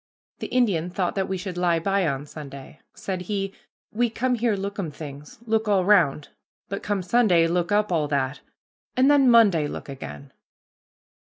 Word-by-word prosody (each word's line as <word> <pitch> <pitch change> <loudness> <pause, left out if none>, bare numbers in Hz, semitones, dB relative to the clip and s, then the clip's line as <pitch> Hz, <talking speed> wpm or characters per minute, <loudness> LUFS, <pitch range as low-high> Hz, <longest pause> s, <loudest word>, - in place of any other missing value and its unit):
The - - -4
Indian 200 -10 +1
thought 180 -1 -1
that 195 -1 -2
we 190 - -1
should 180 -1 -5
lie 175 -2 +2
by 195 +1 +1
on 140 -1 -2
Sunday. 140 -1 -10 0.2
Said 185 -2 -4
he, 195 +1 -3 0.4
"We 240 +2 +1
come 250 +3 -1
here 235 -2 +1
lookum 200 -3 -4
things, 145 -1 -10
look 220 -1 0
all 195 -3 +2
round, 165 -8 +3 0.4
but 200 - -4
come 205 -2 -2
Sunday 180 -4 +3
look 175 +2 0
up 210 -1 +2
all 155 -4 +1
that, 140 -1 -1 0.6
and 265 +3 +5
then 275 -3 +5
Monday 200 -10 +5
look - - -7
again." 75 - -9
185 Hz, 170 wpm, -24 LUFS, 155-210 Hz, 0.6 s, and